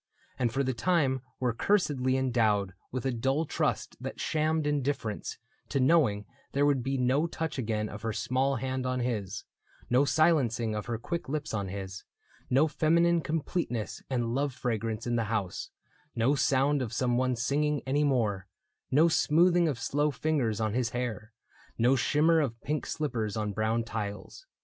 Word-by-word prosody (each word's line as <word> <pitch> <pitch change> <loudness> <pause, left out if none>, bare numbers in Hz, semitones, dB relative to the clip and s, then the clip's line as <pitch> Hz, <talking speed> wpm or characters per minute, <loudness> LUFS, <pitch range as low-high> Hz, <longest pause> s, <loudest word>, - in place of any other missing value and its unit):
And 120 -3 +1
for 135 +4 0
the 130 0 0
time 135 -2 +1 0.2
were 125 -2 +1
cursedly 140 - +1
endowed 110 -7 +1 0.2
With 130 +1 -4
a 135 - +1
dull 135 +6 0
trust - - -1
that - - -6
shammed 155 0 0
indifference 140 -7 -2 0.3
To 140 - 0
knowing 130 -8 +3 0.3
there 140 +1 +3
would 140 -3 +3
be 135 +2 -1
no 130 +6 +2
touch 160 -3 -4
again 110 -3 -1
Of 105 0 -8
her 115 +1 -2
small 130 +5 0
hand 130 +1 -2
on 125 0 -1
his, 110 -6 -3 0.5
no 125 +3 +5
silencing 130 -6 +2
Of 105 +1 -4
her 120 -1 -2
quick 170 +6 -4
lips 150 -2 -3
on 100 -3 -1
his, 95 0 -6 0.5
no 140 +5 +4
feminine 170 +2 +3
Completeness 155 - -2
and 120 -3 -1
love 140 0 -1
fragrance 115 -3 -2
in 120 -1 0
the 115 - 0
house, 105 -4 -3 0.5
No 120 +4 +3
sound 140 0 +2
of 120 -4 -3
some 125 0 +1
one 130 0 +1
singing 145 +4 0
any 140 +3 +1
more, 110 -9 +1 0.4
No 150 +5 +5
smoothing 170 +2 +4
of 145 -6 -1
slow 145 +5 0
fingers 135 -6 0
on 110 -2 0
his 125 -1 0
hair, 120 -2 -4 0.5
No 125 +4 +4
shimmer 155 +6 +3
of 120 -5 -2
pink 150 +1 -2
slippers 115 -9 -2
on 105 -1 -2
brown 110 +2 0
tiles. 110 - -6
130 Hz, 170 wpm, -29 LUFS, 115-150 Hz, 0.5 s, no